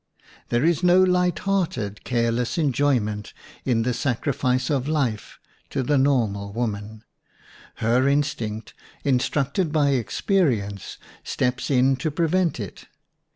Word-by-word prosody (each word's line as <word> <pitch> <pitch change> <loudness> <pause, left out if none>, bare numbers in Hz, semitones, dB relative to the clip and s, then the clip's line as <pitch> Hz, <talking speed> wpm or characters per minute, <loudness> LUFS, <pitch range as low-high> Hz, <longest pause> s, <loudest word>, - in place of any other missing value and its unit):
There 120 +4 +1
is 170 -1 +2
no 180 +1 +5
light 180 -1 +2
hearted, 145 - -1
careless 120 +4 0
enjoyment 125 -8 0 0.3
in 115 -3 +2
the 125 +1 0
sacrifice 130 +1 0
of 135 -2 0
life 135 -9 -1 0.3
to 135 - -1
the 145 +2 +2
normal 110 -8 +1
woman; 110 -1 -4 0.7
her 120 +4 +2
instinct, 120 -7 -1 0.3
instructed 140 +5 0
by 150 -2 +3
experience, 115 - 0 0.3
steps 125 0 -1
in 135 0 +3
to 145 +5 -1
prevent 170 +1 +1
it. 100 -4 -8
130 Hz, 115 wpm, -24 LUFS, 115-150 Hz, 0.7 s, no